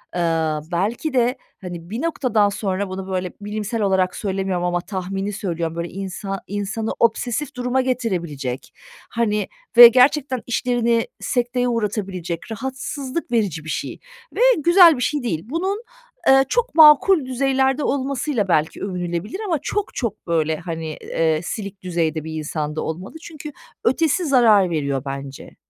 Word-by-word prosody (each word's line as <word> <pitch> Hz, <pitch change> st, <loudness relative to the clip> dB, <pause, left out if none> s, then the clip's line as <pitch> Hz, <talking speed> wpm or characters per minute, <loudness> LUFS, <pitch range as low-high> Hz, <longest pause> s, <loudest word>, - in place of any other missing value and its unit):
ııı, 160 Hz, -3 st, 0 dB
belki 215 Hz, -, -1 dB
de, 250 Hz, +1 st, +2 dB, 0.2 s
hani, 175 Hz, -2 st, -8 dB
bir 225 Hz, +5 st, -4 dB
noktadan 250 Hz, -10 st, +1 dB
sonra 200 Hz, -1 st, -2 dB
bunu 190 Hz, 0 st, -6 dB
böyle 185 Hz, -1 st, -3 dB
bilimsel 210 Hz, +2 st, -3 dB
olarak 190 Hz, -2 st, +1 dB
söylemiyorum 190 Hz, -3 st, -2 dB
ama 175 Hz, 0 st, 0 dB
tahmini 195 Hz, +1 st, -4 dB
söylüyorum, 170 Hz, -5 st, -3 dB
böyle 170 Hz, 0 st, -4 dB
insa 195 Hz, +1 st, -5 dB
insanı 205 Hz, +2 st, -3 dB
obsesif 245 Hz, +5 st, 0 dB
duruma 250 Hz, +1 st, 0 dB
getirebilecek, 170 Hz, -, -3 dB, 0.4 s
hani, 210 Hz, -3 st, 0 dB, 0.3 s
ve 240 Hz, 0 st, +13 dB
gerçekten 255 Hz, +1 st, +3 dB
işlerini 235 Hz, -1 st, +1 dB
sekteye 245 Hz, 0 st, 0 dB
uğratabilecek, 195 Hz, -6 st, -3 dB
rahatsızlık 265 Hz, +4 st, -5 dB
verici 200 Hz, -10 st, 0 dB
bir 160 Hz, -, -8 dB
şey -, -, -4 dB, 0.4 s
ve -, -, -1 dB, 0.2 s
güzel 340 Hz, 0 st, +6 dB
bir -, -, -4 dB
şey 290 Hz, +2 st, 0 dB
değil. 165 Hz, -10 st, -2 dB
Bunun, 380 Hz, -, -2 dB, 0.4 s
eee, 270 Hz, 0 st, +6 dB
çok 485 Hz, +1 st, 0 dB
makul 310 Hz, +1 st, +7 dB
düzeylerde 265 Hz, +2 st, +1 dB
olmasıyla 270 Hz, -5 st, -1 dB
belki 160 Hz, -3 st, 0 dB
övünülebilir 180 Hz, -, -4 dB
ama 335 Hz, -7 st, 0 dB
çok, 415 Hz, -1 st, -3 dB
çok, 220 Hz, -4 st, -4 dB
böyle, 160 Hz, -2 st, +1 dB
hani, 160 Hz, -2 st, -5 dB
eee, 160 Hz, -1 st, 0 dB
silik 200 Hz, -1 st, -6 dB
düzeyde 165 Hz, -3 st, -1 dB
bir 160 Hz, 0 st, -6 dB
insan 155 Hz, -1 st, -3 dB
da -, -, -2 dB
olmalı 180 Hz, -, -6 dB
çünkü 305 Hz, -2 st, -9 dB, 0.3 s
ötesi 325 Hz, +7 st, +2 dB
zarar 225 Hz, -, +5 dB
veriyor 140 Hz, -5 st, -1 dB
bence. 135 Hz, 0 st, -7 dB
210 Hz, 140 wpm, -21 LUFS, 175-260 Hz, 0.4 s, ve